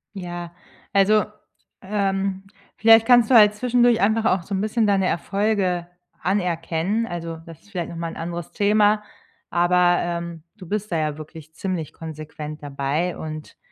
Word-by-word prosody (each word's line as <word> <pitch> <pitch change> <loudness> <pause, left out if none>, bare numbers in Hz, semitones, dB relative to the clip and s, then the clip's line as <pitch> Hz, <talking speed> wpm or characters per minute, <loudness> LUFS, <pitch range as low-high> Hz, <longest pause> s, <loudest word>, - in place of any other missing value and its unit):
Ja, 175 -2 -6 0.4
also, 205 +2 +4 0.6
ähm, 195 -1 -1 0.3
vielleicht 225 0 +6
kannst 240 -3 +6
du 250 - +6
halt 210 -1 +7
zwischendurch 240 0 +3
einfach 220 +2 +2
auch 185 -4 +2
so 200 - -7
'n 190 - 0
bisschen 215 +1 +1
deine 195 -2 +2
Erfolge 190 -2 0 0.3
anerkennen, 180 +3 -1
also 165 -3 -5
das 165 -2 -12
ist 205 - -23
vielleicht 175 -4 -3
noch - - -8
mal 165 0 -3
'n - - -10
anderes 170 0 -5
Thema, 210 +1 +3 0.5
aber, 175 0 +3
ähm, 170 -2 -4
du 185 -4 -11
bist 210 +2 -3
da 165 - +1
ja 150 -1 -1
wirklich 155 0 -11
ziemlich 175 -3 -4
konsequent 155 -1 -8
dabei 145 +5 -2
und 155 -1 -8
180 Hz, 155 wpm, -23 LUFS, 165-210 Hz, 0.6 s, halt